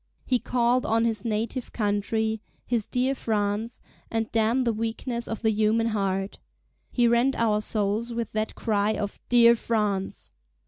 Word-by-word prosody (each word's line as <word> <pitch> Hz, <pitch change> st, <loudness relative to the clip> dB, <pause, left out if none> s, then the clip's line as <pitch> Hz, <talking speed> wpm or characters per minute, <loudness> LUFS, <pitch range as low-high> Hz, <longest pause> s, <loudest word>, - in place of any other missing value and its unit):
He 250 Hz, -1 st, +2 dB
called 245 Hz, +1 st, +1 dB
on 225 Hz, +1 st, +2 dB
his 225 Hz, -3 st, -1 dB
native 230 Hz, +2 st, -2 dB
country—his 220 Hz, +2 st, -2 dB
dear 255 Hz, +2 st, +1 dB
France, 215 Hz, -1 st, -2 dB, 0.3 s
and 225 Hz, -1 st, -2 dB
damn 230 Hz, +3 st, +2 dB
the 235 Hz, -2 st, +1 dB
weakness 230 Hz, +2 st, -3 dB
of 225 Hz, +1 st, -5 dB
the 220 Hz, -, +4 dB
human 220 Hz, +2 st, +2 dB
heart! 195 Hz, -2 st, -2 dB, 0.5 s
he 240 Hz, -1 st, +3 dB
rent 235 Hz, +3 st, +3 dB
our 215 Hz, -2 st, +2 dB
souls 215 Hz, +2 st, -1 dB
with 230 Hz, -1 st, -3 dB
that 215 Hz, 0 st, -2 dB
cry 210 Hz, -1 st, +1 dB
of 205 Hz, -1 st, -4 dB
"Dear 235 Hz, -1 st, +7 dB
France." 210 Hz, -4 st, -2 dB
225 Hz, 145 wpm, -26 LUFS, 210-235 Hz, 0.5 s, Dear